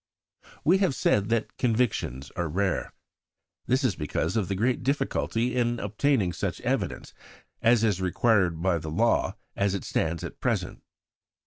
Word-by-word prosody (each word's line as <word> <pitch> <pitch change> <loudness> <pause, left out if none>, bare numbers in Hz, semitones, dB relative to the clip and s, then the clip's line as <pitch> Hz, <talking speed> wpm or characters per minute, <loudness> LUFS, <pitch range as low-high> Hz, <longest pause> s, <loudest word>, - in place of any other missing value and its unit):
'" - - -24
We 185 +5 +5
have 185 -9 +2
said 100 -4 +2
that 115 -1 -1
convictions 110 - 0
are 85 -2 -1
rare. 95 +3 -1 0.8
This 130 +2 +2
is 120 -8 +2
because 75 +7 -2
of 105 -5 +1
the 100 - -1
great 120 +6 +1
difficulty 125 -3 0
in 120 -1 +1
obtaining 105 -2 +1
such - - -3
evidence - - -2 0.5
as 115 -1 +4
is 100 -4 +1
required 95 -3 +2
by 90 -3 +2
the 80 0 -6
law 115 +9 +1 0.2
as 100 0 +1
it 100 - -4
stands 80 0 -1
at - - -7
present. - - -1
105 Hz, 155 wpm, -27 LUFS, 90-120 Hz, 0.8 s, We